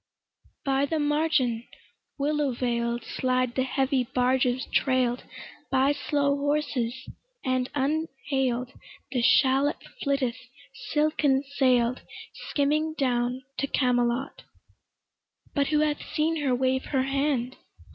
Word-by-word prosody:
By 275 0 +2
the 320 - -1
margin, 295 -6 +1 0.5
willow 290 -1 0
veil'd 235 -1 -1
Slide 255 -1 0
the 260 - 0
heavy 265 0 +1
barges 250 +1 +1
trail'd 255 -2 +1 0.4
By 265 +1 +3
slow 285 -1 0
horses; 280 -4 -1 0.4
and 255 0 0
unhail'd 270 -4 -1 0.4
The 250 -2 0
shallop 270 +3 +4 0.3
flitteth 275 -4 0 0.5
silken 295 -3 +2
sail'd 255 -3 +2 0.5
Skimming 305 +2 +1
down 250 -2 0 0.2
to 275 - 0
Camelot: 250 +1 0 1.1
But 280 -2 +1
who 305 -1 +2
hath 300 -1 0
seen 320 +1 0
her 275 -4 +1
wave 260 +1 0
her 265 -2 0
hand? 270 -2 -1
265 Hz, 105 wpm, -27 LUFS, 250-290 Hz, 1.1 s, shallop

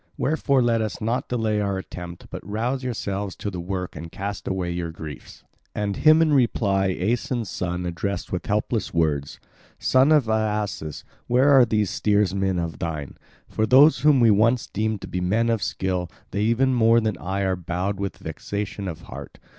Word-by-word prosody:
Wherefore 140 -3 +2
let 115 -1 +2
us 110 -1 -3
not 115 +3 -2
delay 110 -3 0
our 100 -1 -1
attempt, 90 -2 -8
but - - -7
rouse 120 +7 -2
yourselves 100 -5 -3
to 105 - -4
the 90 - -5
work 90 +1 -4
and 80 +2 -8
cast 100 +1 -5
away 95 -2 -1
your 85 -1 -3
griefs." 80 -4 -10 0.3
And 100 -2 -2
him 155 +1 +6
in 155 -2 +2
reply 100 -7 +2
Aeson's 115 +4 -1
son 90 0 -3
addressed 90 +2 -3
with 90 - -3
helpless 105 -1 -1
words: 75 -4 0 0.4
"Son 130 +3 +3
of 150 -7 +4
Aeacus, 105 -8 -2 0.2
where 130 +4 +4
are 135 -3 +7
these 105 -4 0
steersmen 100 -2 +1
of 85 -2 -3
thine? 80 -5 -4 0.3
For 110 - -1
those 135 +4 +6
whom 145 0 +5
we 115 -2 +6
once 115 +4 +3
deemed 110 0 -2
to - - -7
be 90 - -3
men 110 +6 +1
of 115 -3 0
skill, 90 -2 -2 0.2
they 100 - -1
even 130 +4 +2
more 115 -1 +5
than 110 -3 -1
I 95 +3 -2
are 95 -1 +1
bowed 90 +3 -3
with 100 -1 -3
vexation 100 -1 -5
of 85 -4 -6
heart. 70 +3 -10
100 Hz, 180 wpm, -24 LUFS, 90-115 Hz, 0.4 s, are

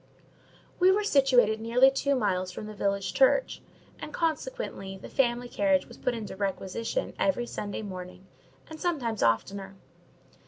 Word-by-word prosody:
We 365 +1 +6
were 405 +2 +3
situated 250 - +4
nearly 250 +4 +5
two 280 +1 +1
miles 185 -6 0
from 195 - -7
the 215 - -7
village 200 -2 -1
church, 270 - +3 0.4
and, - - -7
consequently, 325 - -3
the - - -11
family 245 -2 +1
carriage 285 +2 +2
was - - -13
put 250 - -1
in 225 -2 -5
requisition 200 - -3
every 275 -4 +1
Sunday 210 -2 -5
morning, 185 -1 -8 0.4
and 315 -1 -10
sometimes 255 - -1
oftener. 195 - 0
230 Hz, 145 wpm, -28 LUFS, 195-280 Hz, 0.4 s, We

